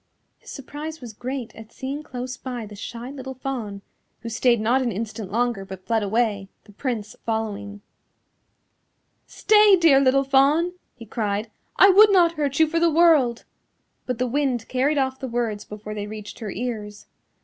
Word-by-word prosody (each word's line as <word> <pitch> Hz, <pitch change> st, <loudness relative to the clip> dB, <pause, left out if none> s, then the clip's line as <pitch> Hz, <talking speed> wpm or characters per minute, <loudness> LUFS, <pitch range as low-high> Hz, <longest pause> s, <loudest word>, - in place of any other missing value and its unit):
His -, -, -15 dB
surprise 300 Hz, +3 st, -7 dB
was 240 Hz, -3 st, -9 dB
great 250 Hz, +2 st, -6 dB
at 225 Hz, 0 st, -12 dB
seeing 275 Hz, +4 st, -5 dB
close 255 Hz, -3 st, -6 dB
by 250 Hz, -3 st, -6 dB
the 210 Hz, 0 st, -11 dB
shy 235 Hz, +5 st, -7 dB
little 265 Hz, -1 st, -7 dB
Fawn, 235 Hz, -7 st, -5 dB, 0.4 s
who 230 Hz, -, -6 dB
stayed 235 Hz, +1 st, +2 dB
not 240 Hz, +5 st, +2 dB
an 245 Hz, -2 st, 0 dB
instant 215 Hz, -1 st, -5 dB
longer 235 Hz, -2 st, 0 dB
but 190 Hz, -1 st, -10 dB
fled 225 Hz, -1 st, +1 dB
away, 205 Hz, -2 st, 0 dB
the 210 Hz, -, -17 dB
Prince 215 Hz, -2 st, -4 dB
following. 205 Hz, -2 st, -3 dB, 1.5 s
"Stay, 420 Hz, -2 st, +5 dB
dear 325 Hz, -6 st, +5 dB
little 275 Hz, 0 st, +3 dB
Fawn," 280 Hz, +6 st, +3 dB, 0.2 s
he 230 Hz, -, -11 dB
cried, 210 Hz, 0 st, -3 dB, 0.2 s
"I 390 Hz, -, +7 dB
would 410 Hz, +2 st, +7 dB
not 350 Hz, -4 st, +5 dB
hurt 290 Hz, -3 st, -2 dB
you 320 Hz, -, +7 dB
for 330 Hz, +2 st, -1 dB
the 335 Hz, 0 st, +4 dB
world." 310 Hz, -8 st, +4 dB, 0.6 s
But 250 Hz, -2 st, -2 dB
the 250 Hz, -, 0 dB
wind 255 Hz, -2 st, -1 dB
carried 275 Hz, +4 st, +1 dB
off 265 Hz, -1 st, 0 dB
the 265 Hz, -, -4 dB
words 230 Hz, -4 st, -2 dB
before 210 Hz, 0 st, -8 dB
they 205 Hz, -1 st, -5 dB
reached 210 Hz, +1 st, -9 dB
her 220 Hz, -3 st, -5 dB
ears. 210 Hz, -1 st, -5 dB
245 Hz, 170 wpm, -23 LUFS, 215-275 Hz, 1.5 s, I